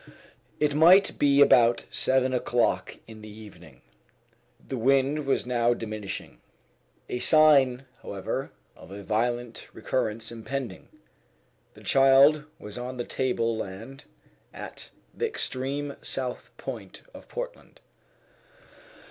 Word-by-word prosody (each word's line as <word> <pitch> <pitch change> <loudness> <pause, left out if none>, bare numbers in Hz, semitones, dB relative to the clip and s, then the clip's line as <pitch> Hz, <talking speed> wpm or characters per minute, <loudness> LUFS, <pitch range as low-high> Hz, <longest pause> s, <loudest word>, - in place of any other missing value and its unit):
It 150 -1 +1
might 175 +6 +5
be 140 0 +4
about 120 -4 +5
seven 130 0 +1
o'clock 120 -1 0
in 110 -1 -12
the 105 - -10
evening. 90 - -14 0.8
The 135 - -4
wind 135 +4 +2
was 135 - +1
now 120 -1 +1
diminishing 110 -3 -7 0.7
a 125 - -3
sign, 135 -4 +5 0.2
however, 100 -2 -4 0.3
of - - -15
a 100 +1 -9
violent 120 +2 -2
recurrence 115 -3 -2
impending. 120 +2 -6 0.9
The - - -15
child 135 +3 +5
was 105 +3 -8
on 125 +1 -6
the 120 - -2
table 115 -3 -1
land 110 +6 -8 0.5
at - - -9 0.2
the - - -1
extreme 140 +2 -3
south 130 -2 -4
point - - -8
of - - -13
Portland. - - -8
125 Hz, 115 wpm, -26 LUFS, 115-140 Hz, 0.9 s, might